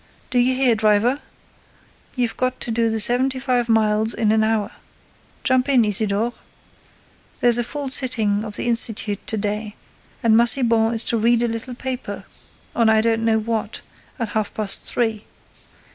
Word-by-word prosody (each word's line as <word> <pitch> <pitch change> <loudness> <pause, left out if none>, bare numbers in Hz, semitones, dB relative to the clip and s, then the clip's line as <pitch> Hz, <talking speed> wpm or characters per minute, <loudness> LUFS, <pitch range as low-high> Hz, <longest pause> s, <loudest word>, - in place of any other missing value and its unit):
Do 250 - +2
you 255 +1 +2
hear, 255 -2 +3
driver? 220 +4 +2 1.0
You've 245 -3 -1
got 255 0 -2
to 235 - -2
do 225 -1 0
seventy 250 +4 +2
five 250 -2 -1
miles 220 0 +2
an 220 0 +2
hour. 220 -1 0 0.7
Jump 260 0 +1
in, 250 -5 +4
Isidore. 210 +3 0 1.1
There's 240 -1 +4
a - - 0
full 280 +3 -5
sitting 220 -6 +1
of 210 -2 -7
the - - -3
Institute 225 -3 0
to 220 - -2
day, 210 +1 -3 0.5
and 225 -1 +4
Massiban 230 -1 +3
is 225 - +2
to 230 - 0
read 235 +2 +2
a - - +1
little 230 +2 -5
paper, 260 0 -6 0.5
on 230 -2 +3
I 220 0 +4
don't 225 0 0
know 225 -1 +2
what, 220 0 -3 0.4
at 230 -5 -3
half 215 -1 -2
past 205 -2 0
three. 225 -3 -1
230 Hz, 160 wpm, -21 LUFS, 220-245 Hz, 1.1 s, in